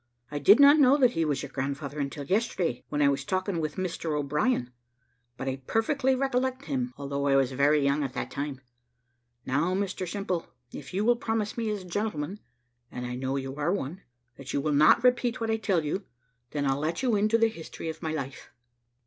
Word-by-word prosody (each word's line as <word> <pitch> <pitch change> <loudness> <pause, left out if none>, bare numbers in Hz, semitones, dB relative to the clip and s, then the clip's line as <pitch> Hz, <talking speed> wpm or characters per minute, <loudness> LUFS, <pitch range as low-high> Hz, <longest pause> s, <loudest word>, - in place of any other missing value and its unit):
I 145 - -2
did 200 - +7
not 285 +2 +8
know 275 0 +6
that 255 -4 +4
he 165 - 0
was 145 -3 -1
your - - -7
grandfather 140 +2 -4
until 140 0 -3
yesterday, 185 - 0
when 145 0 +1
I - - +5
was 140 0 +1
talking 185 +2 -1
with 155 -1 -3
Mr 165 -4 -2
O'Brien; 145 - 0 0.7
but 130 - -5
I 135 0 -1
perfectly 265 +4 +1
recollect 260 0 -1
him, 255 -3 -2
although 140 0 -2
I 135 - +4
was 135 -1 +3
very 140 +2 +3
young 140 +2 +2
at 135 -2 -4
that - - -4
time. 140 -2 -4 0.8
Now, 150 +8 +1
Mr 190 -2 -2
Simple, 190 -4 -2 0.3
if 140 -2 -8
you 200 +3 -1
will 240 +1 +4
promise 225 -2 -2
me 230 -2 -2
as 210 -3 -3
a - - -12
gentleman 195 -2 -3 0.5
(and 125 0 -5
I 125 - -4
know 130 +2 -2
you 135 0 -4
are 150 +4 0
one), 180 -1 -3 0.4
that 135 -1 -7
you - - +1
will 150 +1 0
not 155 +10 +5
repeat 245 -1 +2
what 225 -1 -1
I 220 - +1
tell 190 -7 0
you, 190 +7 -2 0.5
then 145 -1 -2
I'll 135 0 +1
let 160 - -2
you 245 -4 +2
into 215 +2 +3
the 225 0 +4
history 165 -5 -8
of 160 0 -5
my 160 -2 -2
life." 140 -4 -5
165 Hz, 210 wpm, -28 LUFS, 140-220 Hz, 0.8 s, not